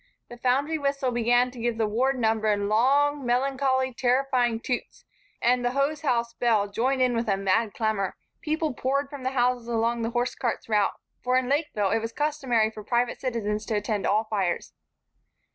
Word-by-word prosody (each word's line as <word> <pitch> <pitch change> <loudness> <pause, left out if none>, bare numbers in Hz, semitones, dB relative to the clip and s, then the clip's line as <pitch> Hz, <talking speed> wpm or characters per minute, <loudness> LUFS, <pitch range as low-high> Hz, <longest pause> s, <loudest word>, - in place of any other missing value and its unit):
The 240 - -10
foundry 280 +6 +1
whistle 275 -2 0
began 245 +1 +2
to 250 - -11
give 235 0 -1
the 225 - +1
ward 255 +6 +1
number 220 -2 +1
in 205 -1 +1
long, 280 +6 +2
melancholy, 260 +1 +1
terrifying 250 -2 +1
toots 245 +1 -4 0.4
and 245 +1 +3
the 245 0 0
hosehouse 275 -4 0
bell 225 -5 +2
joined 255 +6 0
in 250 -1 +2
with 230 0 -1
a 195 -2 +2
mad 200 +3 +1
clamor. 215 -4 -1 0.3
People 310 -1 -1
poured 275 +3 -1
from 285 -2 -7
the 255 - -1
houses 250 -2 0
along 235 0 0
the 230 - -1
hosecart's 240 0 -2
route, 210 -2 +1 0.2
for 255 0 +2
in 255 -1 0
Lakeville 270 -9 0
it 225 - +2
was 225 +1 -5
customary 265 -7 +1
for 215 -1 -9
private 240 +3 0
citizens 215 -4 -2
to 220 - -1
attend 205 -1 -1
all 215 +2 +2
fires. 195 -5 -2
240 Hz, 180 wpm, -26 LUFS, 220-265 Hz, 0.4 s, and